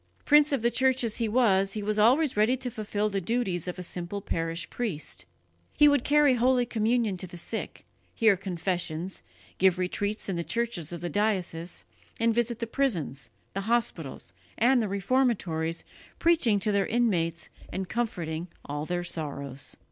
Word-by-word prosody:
Prince 295 0 +6
of 275 -5 0
the 235 - +3
Church 260 +1 +2
as 225 -2 -2
he 230 - 0
was, 195 -5 +3
he 210 - -3
was 210 +1 0
always 260 +7 +4
ready 220 +5 +3
to 250 -1 -4
fulfil 210 -1 -1
the 200 -2 -1
duties 190 -4 -1
of 180 - -4
a 180 - -5
simple 175 +3 -4
parish 165 -3 -2
priest. 150 - -3 0.5
He 295 - +7
would 285 -4 +4
carry 295 -2 +5
holy 250 0 +3
communion 225 -3 +1
to 185 - -4
the 175 - -10
sick, 220 +6 -5 0.3
hear 220 -4 +5
confessions, 180 -1 -3 0.4
give 190 -1 +4
retreats 205 +3 -1
in 190 -3 -2
the 170 - -1
churches 230 -8 -2
of 170 -2 -6
the 175 - -3
diocese, 185 -5 -1 0.3
and 230 0 +3
visit 235 0 0
the 230 - -2
prisons, 175 - -1 0.2
the 195 - -2
hospitals 165 - -1 0.2
and 245 +2 +4
the 220 - 0
reformatories, 195 -6 0 0.3
preaching 315 -12 +3
to 210 - +1
their 200 -1 +1
inmates 175 -8 0 0.2
and 190 0 -4
comforting 175 -7 -2 0.2
all 145 +1 -4
their 175 0 -1
sorrows. 140 -5 -4
205 Hz, 170 wpm, -28 LUFS, 175-235 Hz, 0.5 s, He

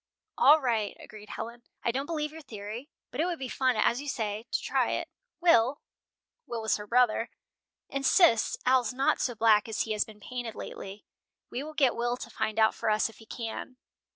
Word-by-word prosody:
"All 295 +5 +7
right," 230 -7 -1
agreed 210 -1 -12
Helen. 235 +1 -6 0.2
"I 235 - +2
don't 270 +4 -3
believe 300 -3 -2
your 320 +1 -10
theory, 220 +1 -7 0.2
but 265 - -2
it - - +2
would 350 -2 -2
be 265 - -4
fun, 255 0 +1
as 235 +4 +2
you 290 - -8
say, 220 -2 -3
to - - 0
try - - +1
it. - - -2 0.3
Will" 280 -5 +4 0.7
Will 235 - -3
was 220 - +2
her 210 0 -8
brother 235 -1 +3 0.6
"insists 275 - +4
Al's 250 -2 +3
not 270 +1 +2
so 245 - -1
black 220 -1 +4
as 220 - -1
he 220 - -2
has 210 -1 +2
been 215 -1 -14
painted 240 +1 -5
lately. 195 +2 -8 0.5
We 250 - -3
will 310 +2 -8
get 270 -5 +3
Will 240 +1 0
to 235 - -8
find 215 0 -2
out 220 0 +5
for - - -2
us 215 +1 +2
if 225 - -16
he 220 - -15
can." 235 +2 -6
235 Hz, 205 wpm, -29 LUFS, 220-270 Hz, 0.7 s, All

